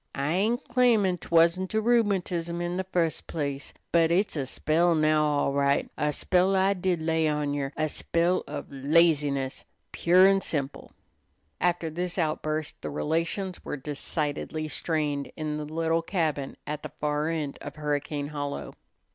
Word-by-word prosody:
I 140 +3 0
ain't 220 +8 0
claimin' 230 -7 +3
't - - -11
wasn't 170 +3 +3
rheumatism 195 -7 +1
in 175 +1 -2
the 190 - -1
fust 170 -3 -1
place, 140 -3 -4 0.2
but 165 -1 +4
it's 185 +3 +1
a 140 -3 -2
spell 165 +5 +2
now, 155 0 +3
all 145 -2 +1
right 140 0 +1
a 150 0 0
spell 185 +5 +2
I 190 +1 +3
did 185 -2 0
lay 160 0 +2
on 150 -1 0
yer, 140 -1 -2
a 155 - +1
spell 170 +4 0
of 145 0 -5
laziness 140 -1 +2 0.3
pure 180 +2 +5
an' 195 0 +3
simple!" 140 -6 -3 0.7
After 170 -2 0
this 180 +3 -3
outburst 155 -2 -2
the - - -4
relations 165 +5 -2
were - - -4
decidedly 150 +2 -3
strained 150 -2 -1
in 155 -1 -2
the 150 - -4
little 165 +2 0
cabin 160 -6 -2
at 150 0 -4
the - - -6
far 150 +1 0
end 155 -4 -3
of 145 - -7
Hurricane 145 -1 -2
Hollow. 145 -1 -4
160 Hz, 155 wpm, -27 LUFS, 150-175 Hz, 0.7 s, pure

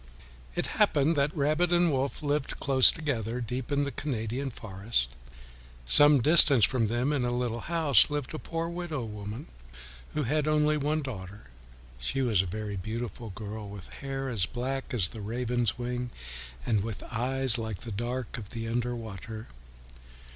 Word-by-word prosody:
It - - 0 0.2
happened 150 +4 +4
that 145 +2 0
Rabbit 155 +5 +2
and 175 -1 +4
Wolf 135 +2 -2
lived 145 -1 -1
close 135 -2 +7
together, 125 -7 -2
deep 125 +3 -4
in 145 0 +2
the 140 - -2
Canadian 125 0 -3
forest. 100 - -2 0.8
Some 145 - +7
distance 145 -7 +7
from 120 -4 +1
them, 120 +6 0
in 135 -4 0
a 120 - 0
little 120 -1 -1
house, 160 -4 +4
lived 145 -2 -3
a 155 - -4
poor 165 0 -3
widow 170 -6 -4
woman 105 0 -6 0.7
who 150 - +1
had 150 +4 0
only 150 0 +3
one 150 +1 0
daughter. 100 -6 -7 0.6
She 100 - 0
was 110 -7 +3
a 95 - -4
very 105 +2 -4
beautiful 115 +3 -5
girl, 105 +1 -7
with 100 -3 -9
hair 135 -1 -4
as 105 -8 -1
black 135 +3 -4
as 100 -9 +1
the 110 - -8
raven's 120 +1 -1
wing, 125 0 -3 0.6
and 110 -4 +2
with 110 -1 -5
eyes 125 +1 +1
like 110 -5 -4
the 115 - -7
dark 120 +3 -3
of 105 -3 -10
the 115 -2 -5
underwater. 115 - -4
125 Hz, 160 wpm, -29 LUFS, 110-145 Hz, 0.8 s, close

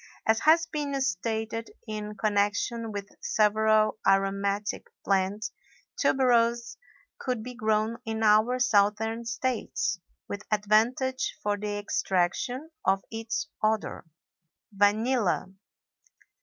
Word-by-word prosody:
As 220 0 +3
has 320 +4 +5
been 290 -3 -3
stated 225 -1 -2 0.2
in 210 -1 -5
connection 210 +2 0
with 200 -1 -5
several 215 0 +3
aromatic 195 +1 +1 0.2
plants, 195 +2 0 0.4
tuberose 235 -2 +2 0.4
could 250 -4 -2
be 250 +1 -7
grown 220 0 0
in 225 -1 -3
our 215 +4 +4
southern 220 -1 +2
States 245 - -2 0.3
with 200 - -5
advantage 225 +5 +1
for 205 0 +1
the 205 0 -3
extraction 205 - -1
of 195 0 +2
its 225 0 -3 0.2
odor. 215 0 0 0.7
VANILLA. 205 0 +2
220 Hz, 100 wpm, -28 LUFS, 205-235 Hz, 0.7 s, has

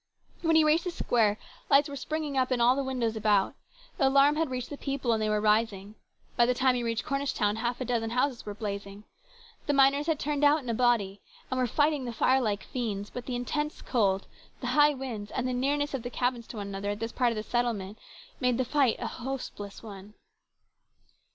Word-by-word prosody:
When 325 -1 +2
he 320 - +6
reached 310 +3 +3
the - - 0
square, 225 -10 +1 0.3
lights 285 +1 +5
were 285 - -7
springing 305 +1 -3
up 260 0 +1
in 255 - +2
the 250 +3 +3
windows 250 -4 -1
all - - -6
about. 205 -2 +2 0.5
The 270 - +4
alarm 280 +2 +5
had 320 -1 0
reached 255 +1 -4
the 290 - -5
people, 275 -4 -1
and 220 - 0
they 215 - 0
were 210 0 +1
rising. 210 -1 +1 0.4
By 240 -1 +4
the 250 - +2
time 260 +1 +3
he 245 - -1
reached 230 -1 -2
Cornish 275 0 -1
town 210 +1 0
half 240 +2 -2
a 255 - -3
dozen 230 -2 -1
houses 250 +1 0
were 205 -1 -6
blazing. 200 -1 -6 0.6
The 290 - +2
miners 275 +2 +4
had 320 -2 +1
turned 295 0 -1
out 295 0 +4
in 250 - -6
a - - -1
body, 220 -5 +1 0.3
and 260 - 0
were 250 - +2
fighting 290 +2 +1
the 240 - -4
fire 260 +3 +3
like 210 -4 -1
fiends, 210 -5 -4
but 245 -1 -7
the 250 - -2
intense 295 +5 -3
cold, 200 -6 +1 0.3
the - - -2
high 295 0 +5
wind, 235 -6 -6
and 255 0 -1
the 255 - -1
nearness 285 +3 0
of 270 - -2
the 245 - -5
cabins 245 -1 -2
to 230 - -9
one 200 -1 -5
another 200 +1 -4
at 205 0 -3
this 225 +1 -3
part 250 -2 +2
of - - -3
the 215 - -3
settlement, 220 -4 -2 0.4
made 250 -2 +1
the 260 - 0
fight 265 -2 +2
a - - -4
most 270 0 -3
hopeless 200 +1 -9
one. 205 -1 -10
245 Hz, 230 wpm, -28 LUFS, 215-275 Hz, 0.6 s, he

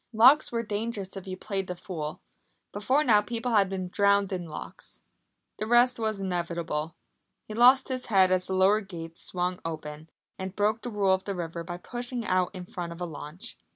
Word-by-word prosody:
Locks 255 +7 +6
were 230 -1 -1
dangerous 210 -2 -4
if 195 0 -8
you 185 0 -5
played 195 -1 -3
the 180 - -4
fool. 160 -4 -6 0.5
Before 255 +9 +2
now 215 -6 +5
people 230 +3 -3
had 200 -4 +4
been 190 -1 -3
drowned 200 0 +3
in 175 -2 -4
locks. 155 - -9 0.6
The 215 - -2
rest 240 +1 +4
was 220 -2 -1
inevitable. 170 -4 -2 0.5
He 215 - -8
lost 250 +4 +6
his 255 -1 -3
head 190 -4 +4
as 185 0 +1
the 190 - -1
lower 195 +3 +4
gates 165 -4 -9
swung 180 0 -2
open, 155 -1 -6 0.3
and 190 0 -5
broke 210 +2 +1
the 245 - -5
rule 200 -4 +2
of 190 0 -1
the 200 - -3
river 170 -1 -4
by 175 +1 -6
pushing 240 +4 -5
out 185 -2 +2
in 180 -1 -6
front 175 -1 -6
of 170 - -9
a 180 - -2
launch. 155 +1 -7
190 Hz, 195 wpm, -28 LUFS, 175-220 Hz, 0.6 s, Locks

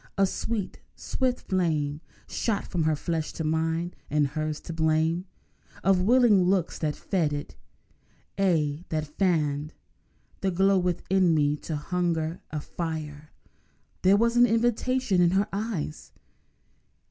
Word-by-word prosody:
A 195 - +5
sweet, 210 +1 -3 0.2
swift 255 -1 -1
flame 155 -5 -1 0.3
Shot 220 -4 -1
from 165 -3 -1
her 155 -1 +2
flesh 160 +1 -3
to 160 - -4
mine—and 160 -2 -1
hers 155 +1 -3
the 165 - -7
blame 160 +2 +1 0.6
Of 190 -1 +4
willing 230 -1 +5
looks 180 -1 +1
that 150 -2 -1
fed 170 -7 0
it; 145 0 -5 0.8
aye, 165 -5 +1
that 155 -1 -1
fanned 150 -3 0 0.6
The 195 - 0
glow 195 +2 +3
within 180 0 +2
me 145 -1 +2
to 160 - -6
a - - 0
hungry 165 +1 -1 0.2
fire. 155 -2 -5 0.7
There 190 +2 +5
was 235 +2 +2
an 245 0 +7
invitation 235 -2 +1
in 175 - +5
her 200 - +2
eyes. 200 -8 -4
170 Hz, 130 wpm, -27 LUFS, 155-195 Hz, 0.8 s, an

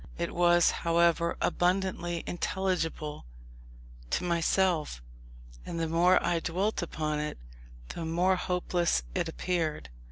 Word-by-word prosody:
It 170 0 -3
was, 175 0 +4
however, 170 0 +2
abundantly 175 -2 0
intelligible 170 - -2 0.8
to - - 0
myself; 170 - +1 0.6
and 170 - -5
the 165 - 0
more 175 +3 +4
I 170 - +1
dwelt 185 +6 -1
upon 155 -3 -2
it, 150 0 -4 0.5
the 170 - -5
more 175 +4 +2
hopeless 180 - 0
it - - -1
appeared. 160 - -2
170 Hz, 115 wpm, -29 LUFS, 165-180 Hz, 0.8 s, was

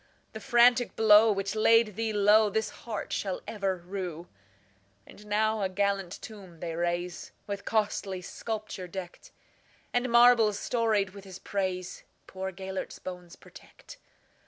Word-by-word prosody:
The 220 - -6
frantic 240 +2 +4
blow 220 0 +6
which 195 0 -2
laid 220 -1 +4
thee 225 0 -1
lowThis 210 +1 +3
heart 220 -4 -6
shall 190 -2 -2
ever 195 -3 -2
rue."And 105 - -11
now 215 +1 +1
a 190 - 0
gallant 195 -1 -1
tomb 190 -6 -11
they 165 -1 -4
raise, 175 +1 -3
With 200 -1 -5
costly 205 -4 -1
sculpture 215 -2 -6
decked; 190 - -9 0.6
And 245 0 0
marbles 235 -3 +6
storied 220 -5 0
with 200 0 -12
his 190 -2 -10
praisePoor 190 0 -5
Gêlert's 190 +1 -6
bones 180 -2 -9
protect. - - -15
200 Hz, 125 wpm, -28 LUFS, 180-220 Hz, 0.6 s, blow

